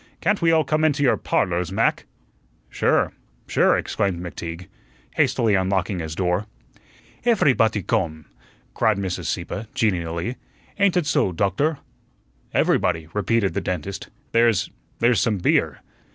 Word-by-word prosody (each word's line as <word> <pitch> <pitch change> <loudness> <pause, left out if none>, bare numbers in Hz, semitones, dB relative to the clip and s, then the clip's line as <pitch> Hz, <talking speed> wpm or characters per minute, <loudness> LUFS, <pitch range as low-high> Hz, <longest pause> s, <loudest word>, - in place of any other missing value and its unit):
Can't 205 -1 +1
we 165 -1 +4
all 160 -1 +4
come 155 +2 0
into 145 -2 +2
your 130 - +4
'Parlors', 90 0 -1
Mac?" 110 +4 0 0.6
"Sure, - - +1 0.3
sure," - - +3
exclaimed 95 -4 -1
McTeague, 85 0 -6 0.5
hastily 115 -3 +2
unlocking 95 -1 0
his 80 -1 -5
door. 90 +3 0 0.8
"Efery 220 - +4
botty 110 -6 +1
gome," 80 -9 -1 0.5
cried 110 -3 +2
Mrs. 95 -2 -3
Sieppe, 110 +3 -4
genially. 85 +1 -1 0.4
"Ain't 200 -2 +3
ut 175 - +1
so, 120 -9 +1
Doktor?" 100 - 0 0.7
"Everybody," 80 -3 +1
repeated 105 0 +1
the - - -1
dentist. 90 +1 -4 0.2
"There's 115 -3 +2 0.3
there's 120 0 +3
some 110 -3 +1
beer." 90 - +1
100 Hz, 130 wpm, -23 LUFS, 90-120 Hz, 0.8 s, we